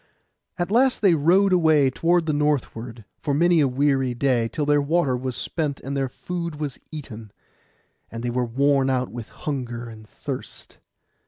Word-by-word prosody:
At 175 +1 -2
last 250 +1 +3
they 190 -4 +6
rowed 180 +6 +4
away 155 -6 +4
toward 170 +4 +2
the 155 - 0
northward, 125 -6 -2
for 145 - -1
many 170 +2 +4
a 145 - +4
weary 135 -1 +1
day, 120 -3 +1
till 150 +5 -3
their 145 0 +3
water 140 -2 +1
was 125 0 -4
spent, 150 -4 -2
and 140 +1 -5
their 135 -1 -1
food 170 +3 -5 0.3
eaten; 115 -9 -8 0.8
and 115 +1 -7
they 120 - -1
were 125 +1 0
worn 135 +3 +2
out 130 -1 0
with 120 -2 -7
hunger 120 -5 -5
and 110 -1 -12
thirst. - - -8
140 Hz, 165 wpm, -23 LUFS, 125-160 Hz, 0.8 s, they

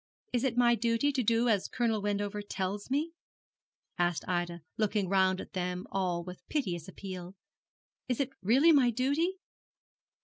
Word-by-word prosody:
'Is 245 0 +1
it 250 -3 0
my 240 -1 +5
duty 235 +4 +2
to 270 -2 0
do 230 +1 +2
as 210 -5 +2
Colonel 225 -4 0
Wendover 205 0 -1
tells 200 +1 -4
me?' 295 +5 0 0.9
asked 175 -1 +1
Ida, 175 -2 -2
looking 210 -2 0
round 190 0 +3
at - - -9
them 180 0 -2
all 180 -3 0
with 180 +1 -9
piteous 180 - -2
appeal. 185 -1 -8 0.7
'Is 250 - 0
it 270 -2 0
really 260 - +5
my 275 -5 +5
duty?' 285 - +1
205 Hz, 150 wpm, -31 LUFS, 185-245 Hz, 0.9 s, my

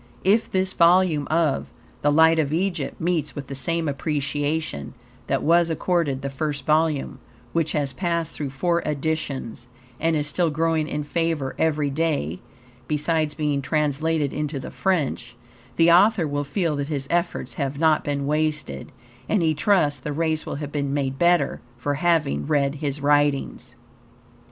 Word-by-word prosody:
If 210 +5 +3
this 190 0 0
volume 170 -3 +4
of 155 -4 +1 0.3
"The 145 - +3
Light 160 +2 +5
of 145 -2 0
Egypt" 170 -4 -2
meets 170 -2 -1
with 145 - -5
the 135 - -7
same 165 +4 0
appreciation 145 - -2 0.3
that - - 0
was 170 +1 +4
accorded 160 -5 0
the 140 - -2
first 145 -1 -3
volume, 155 -3 +1 0.3
which 165 -2 0
has 145 -3 0
passed 170 0 -1
through 145 -2 -4
four 170 +6 0
editions, 140 -6 -3 0.3
and 165 +1 +1
is 150 -1 0
still 165 +3 +1
growing 160 0 0
in 150 -1 -3
favor 160 -3 -1
every 150 -3 +1
day 140 - -1 0.5
(besides 155 0 0
being 150 -3 0
translated 150 +1 0
into 150 -1 -3
the 130 - -7
French), 145 -9 -1 0.4
the 165 +4 +5
author 190 0 +5
will 145 0 -2
feel 160 +2 -1
that 140 0 -2
his 145 -3 -2
efforts 170 -7 -1
have 140 +3 -3
not 160 0 +3
been 140 -1 -2
wasted, 150 0 -1 0.4
and 205 -5 +2
he 160 -1 +3
trusts 150 -3 +2
the 150 +3 -5
race 160 0 -1
will - - -3
have 145 0 -5
been 140 -1 -2
made 135 -2 -2
better 175 0 +2 0.2
for 145 +4 -1
having 155 -2 +1
read 140 -2 +2
his 145 -1 -2
writings. 145 -1 +1
150 Hz, 160 wpm, -23 LUFS, 140-165 Hz, 0.5 s, Light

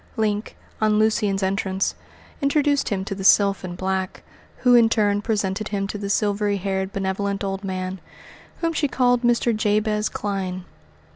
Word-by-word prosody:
Link, 210 -1 -1 0.2
on 215 -1 +3
Lucian's 210 -2 +1
entrance, 190 0 0 0.5
introduced 285 0 +2
him 190 -2 -2
to 200 - -4
the 195 0 -6
sylph 200 0 +4
in 175 -1 -5
black, 190 0 -3 0.4
who 250 - +6
in 240 -1 +7
her - - +2
turn 205 -2 +2
presented 205 -1 -1
him 200 -1 -2
to 200 +1 -5
the 200 -1 -4
silvery 205 0 +1
haired, 190 0 -2
benevolent 200 +1 -2
old 195 0 -3
man, 185 -1 -4 0.6
whom 330 -1 0
she 300 -2 +1
called 245 -2 +2
Mr. 240 -1 +2
Jabez 210 0 +1
Clyne. 190 -3 -3
205 Hz, 160 wpm, -23 LUFS, 195-215 Hz, 0.6 s, in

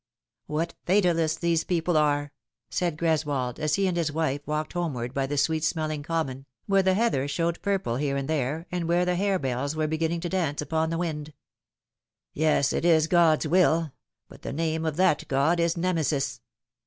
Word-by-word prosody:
" - - -66
What 160 +3 -2
fatalists 170 -4 +2
these 170 -1 +1
people 175 -1 0
are 145 -1 +2 0.2
!" - - -66
said 175 -4 -1
Greswold, 150 -6 -1
as 150 -1 +1
he 200 - +1
and 185 -2 0
his 165 -3 0
wife 145 -2 -1
walked 150 0 -2
homeward 135 -9 -3
by 135 0 -1
the 145 +1 -3
sweet 155 +2 +1
smelling 155 -2 -1
common, 145 -4 -3 0.2
where 195 -1 +3
the 190 0 +2
heather 205 - +1
showed 165 +4 -1
purple 195 -12 -1
here 140 0 -1
and 135 -1 -3
there, 155 +1 -1
aud 175 -2 -1
where 175 +2 +2
the 180 - +1
hare 195 +1 +1
bells 135 0 -2
were 155 0 0
beginning 160 +2 -1
to 175 - -2
dance 165 -6 -1
upon 160 +2 0
the 165 - -2
wind. 155 -3 -4 0.5
" - - -66 0.2
Yes, 150 -3 +2
it - - -1
is 160 -3 +4
God's 165 -2 +3
will; 165 -2 +3 0.4
but - - -15
the - - -5
name 160 +1 -1
of 155 - -1
that 180 -4 +2
God 140 +6 +2
is 170 0 +1
Nemesis." 160 -6 -1
160 Hz, 195 wpm, -26 LUFS, 145-170 Hz, 0.5 s, is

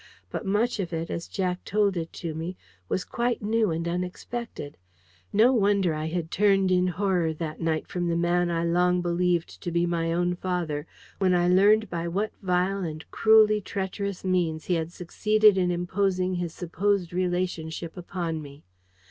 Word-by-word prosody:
But 210 - -4
much 215 +4 +1
of 180 -3 -2
it, 165 0 -3
as 170 - -4
Jack 180 -2 -2
told 205 -1 +1
it 165 -1 -3
to 165 -3 -5
me, 165 +4 -5 0.3
was 185 - -1
quite 240 -2 -1
new 220 0 +2
and 165 +1 -2
unexpected. 180 0 -5 0.6
No 230 +5 +5
wonder 200 -6 +2
I 155 +1 -3
had 165 0 -3
turned 195 -1 +3
in 180 0 +3
horror 180 -2 0
that 155 0 -5
night 160 -1 -1
from 175 -1 -2
the 170 - 0
man 175 +1 +2
I 165 -1 0
long 180 +1 +2
believed 175 -1 0
to 175 - -3
be 170 +1 +2
my 165 -1 0
own 175 +1 +1
father, 170 -5 -3 0.3
when 185 -2 +3
I 175 0 +3
learned 205 +4 +5
by 170 -1 -3
what 200 +5 -1
vile 185 +1 +1
and 155 -1 -5
cruelly 215 -1 +5
treacherous 195 0 -4
means 175 -4 0
he 180 - 0
had 165 -1 -1
succeeded 210 +4 +3
in 180 -2 +1
imposing 185 +1 0
his 175 -2 -2
supposed 180 +1 -1
relationship 175 -2 -2
upon 175 -3 -4
me! 140 0 -12
180 Hz, 175 wpm, -26 LUFS, 170-195 Hz, 0.6 s, No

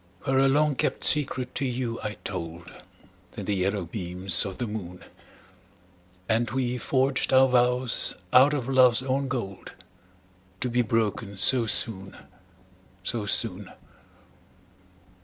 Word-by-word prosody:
Where 135 0 0
a 135 - +4
long 150 +2 +2
kept - - -2
secret 130 -4 +2
to 140 - -2
you 120 -2 -4
I 105 -1 -5
told, 85 -3 -7 0.7
In - - -6
the 105 - -2
yellow 95 0 -2
beams 90 0 0
of 95 - -8
the 125 - -3
moon, 95 -5 -8 1.2
And 115 +1 0
we 125 0 -2
forged 130 +2 0
our 130 0 +5
vows 125 -1 +2 0.2
out 135 +3 +5
of 130 -4 -4
love's 130 -2 +3
own 135 +1 -2
gold, 115 -7 -6 0.9
To 125 - 0
be 125 +1 +1
broken 110 -3 -2
so 115 +4 +3
soon, 100 -3 +1 0.9
so 105 +2 -3
soon! 105 -2 +2
120 Hz, 130 wpm, -25 LUFS, 100-130 Hz, 1.2 s, our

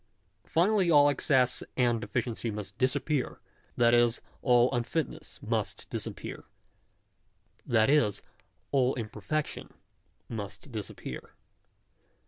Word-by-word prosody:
Finally 185 +2 +3
all 145 -2 +7
excess 130 -2 +2 0.2
and 120 -2 +3
all - - -5
deficiency 120 0 -2
must 105 -2 -6
disappear; 140 +1 0 0.4
that 120 0 +5
is, 120 -1 +4 0.2
all 125 +1 +4
unfitness 120 +5 -3
must - - -2
disappear; - - -5 1.2
that 110 -2 +4
is, 135 -8 +2 0.5
all 130 -1 +3
imperfectiop 120 +6 -3 0.6
must 110 +5 -7
disappear. 110 -3 -7
125 Hz, 100 wpm, -29 LUFS, 115-145 Hz, 1.2 s, all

